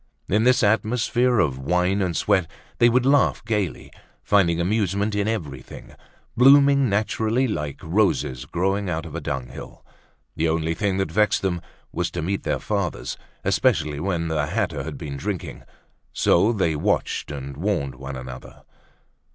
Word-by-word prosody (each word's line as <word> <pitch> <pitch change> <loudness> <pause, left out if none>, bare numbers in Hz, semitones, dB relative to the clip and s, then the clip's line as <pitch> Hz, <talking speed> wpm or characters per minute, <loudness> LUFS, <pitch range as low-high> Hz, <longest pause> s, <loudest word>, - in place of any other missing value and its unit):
In 110 +4 +2
this 125 0 +4
atmosphere 120 +3 +2
of 65 -10 +1
wine 90 +7 +1
and 90 -3 -1
sweat 95 -4 +1 0.3
they 120 - +6
would 125 +1 +2
laugh 135 -3 +3
gaily, 105 -7 -2 0.3
finding 85 -5 +3
amusement 100 +2 0
in 105 0 0
everything, 85 -12 -5 0.4
blooming 140 +1 +6
naturally 110 +4 +1
like 75 - -4
roses 80 - 0
growing 95 +5 -1
out 80 -1 -2
of 80 - -9
a 85 - -4
dunghill. 65 -3 -6 0.5
The 80 +1 +1
only 80 0 0
thing 95 +1 -1
that 95 -5 -1
vexed 105 +2 +2
them 90 -3 -1 0.3
was - - -2
to 85 - -4
meet 95 +4 -1
their - - -1
fathers, 100 -5 -3 0.3
especially 75 -1 +1
when 85 -1 -1
the 80 -1 -1
latter 75 0 -1
had - - -6
been 70 -2 -6
drinking. 90 +5 -5 0.5
So 100 +6 +3
they 95 -8 0
watched 75 - -1
and 70 -2 -6
warned 80 -5 -1
one 65 +2 -7
another. 65 0 -10
95 Hz, 150 wpm, -23 LUFS, 80-110 Hz, 0.5 s, they